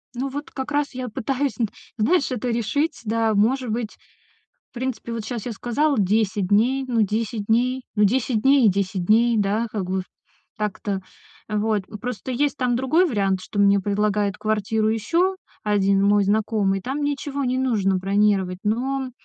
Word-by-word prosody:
Ну, 265 +3 -2
вот 290 +2 -6
как 265 +1 -5
раз 290 -1 0
я 255 0 -4
пытаюсь 270 +6 -2
нт 230 -4 0 0.3
знаешь, 285 +7 +2
это 250 0 -2
решить. 260 +7 -1
Да, 225 0 +1
может 235 +4 +1
быть, 220 -1 -3 0.7
в - - -63
принципе, 250 -1 -4
вот 230 -2 -4
щас 235 -2 -5
я 245 - -3
сказала 255 +6 0
10 205 0 +1
дней, 245 +7 +2
ну, 235 -3 +1
10 215 +1 -1
дней, 250 +3 +2
ну, 210 - +3
10 235 +1 +1
дней 270 0 +5
и - - +7
10 190 -1 -1
дней, 230 +4 +4
да, 210 +3 +1
как 205 -4 -3
бы 190 0 0
в - - -13 0.5
так-то, 205 -2 -3 0.5
э, 215 - -2
вот. 210 -1 0
М, 215 -1 -9
просто 250 +1 -5
есть 285 +3 0
там 250 -2 +1
другой 265 +9 +3
вариант, 195 - 0
что 205 - -5
мне 200 0 +5
предлагает 205 0 0
квартиру 215 0 0
ещё 335 - +1 0.3
1 200 -2 +2
мой 205 0 +4
знакомый, 205 -1 +1
там 270 +7 -3
ничего 285 -1 -2
не 255 0 0
нужно 205 -7 +1
бронировать. 195 -1 +1
Но, 255 +4 -1
220 Hz, 180 wpm, -23 LUFS, 205-260 Hz, 0.7 s, и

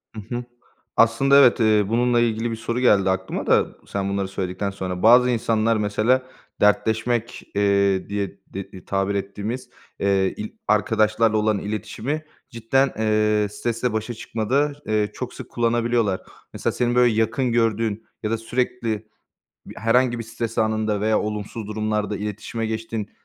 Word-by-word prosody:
Hı 110 - -5
hı. 120 - -3 0.5
Aslında, 115 +5 +5
evet, 125 -3 +6
eee, 110 -2 +4
bununla 120 +1 +2
ilgili 115 0 0
bir - - -2
soru 115 +2 -3
geldi 100 -6 +4
aklıma 95 0 -2
da - - +4 0.2
sen 100 0 -2
bunları 100 -1 -1
söyledikten 95 +1 -3
sonra. 90 -1 -5
Bazı 125 +2 +7
insanlar, 115 -1 +1
mesela, 110 +5 +2 0.4
dertleşmek, 110 +3 +1
eee, 100 -1 +2
diye 100 -1 -3
de 95 -1 -9
tabir 95 +1 0
ettiğimiz, 105 +6 -4 0.3
eee, 95 -1 +2
il 105 - -5 0.2
arkadaşlarla 110 +1 +2
olan 105 -1 +1
iletişimi 125 +8 -4 0.2
cidden, 135 +3 +1
eee, 105 -1 +2
stresle 115 +2 -2
başa 110 +2 -2
çıkmada, 130 +7 -1
eee, 105 -1 0
çok - - -6
sık - - -9
kullanabiliyorlar. 115 -4 +1 0.3
Mesela, - - -1
senin 120 0 0
böyle 125 -2 +5
yakın 115 +3 +1
gördüğün, 115 -2 0 0.2
ya 105 - -1
da 115 - +1
sürekli 115 -2 -2 0.6
bi - - -10
herhangi 120 +2 +2
bir 115 - -5
stres 115 0 -5
anında 110 -2 +1
veya 110 0 +2
olumsuz 105 +1 -4
durumlarda 105 -1 -2
iletişime 105 +2 -4
geçtiğin, 110 -1 -4
110 Hz, 145 wpm, -23 LUFS, 105-120 Hz, 0.6 s, Bazı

